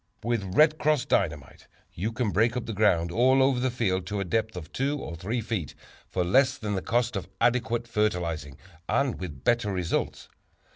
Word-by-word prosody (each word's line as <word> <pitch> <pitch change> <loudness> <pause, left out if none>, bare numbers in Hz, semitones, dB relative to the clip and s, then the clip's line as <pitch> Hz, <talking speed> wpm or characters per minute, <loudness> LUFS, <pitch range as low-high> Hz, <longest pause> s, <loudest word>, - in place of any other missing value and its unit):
With 105 -5 -2
"Red 155 0 +5
Cross" 150 -3 +2
Dynamite 75 -7 -1 0.3
you 105 +7 -2
can 115 -2 -1
break 115 +4 +2
up 125 - -3
the 115 - -4
ground 90 -5 +2
all 130 +7 +4
over 135 -2 +2
the 130 +1 +1
field 95 -7 -1
to 105 +1 -3
a - - 0
depth 110 +2 -1
of 80 -3 -9
two 140 +3 0
or 85 - -6
three 110 +8 -3
feet, 105 -9 -4 0.3
for 90 - 0
less 130 +10 +3
than 105 -1 -3
the 95 - -1
cost 120 +2 0
of 95 -1 -4
adequate 120 -1 +1
fertilizing, 85 -10 -1 0.3
and 140 -3 +1
with 75 -8 -7
better 120 -3 +2
results. 90 -3 -2
110 Hz, 190 wpm, -27 LUFS, 90-120 Hz, 0.3 s, Red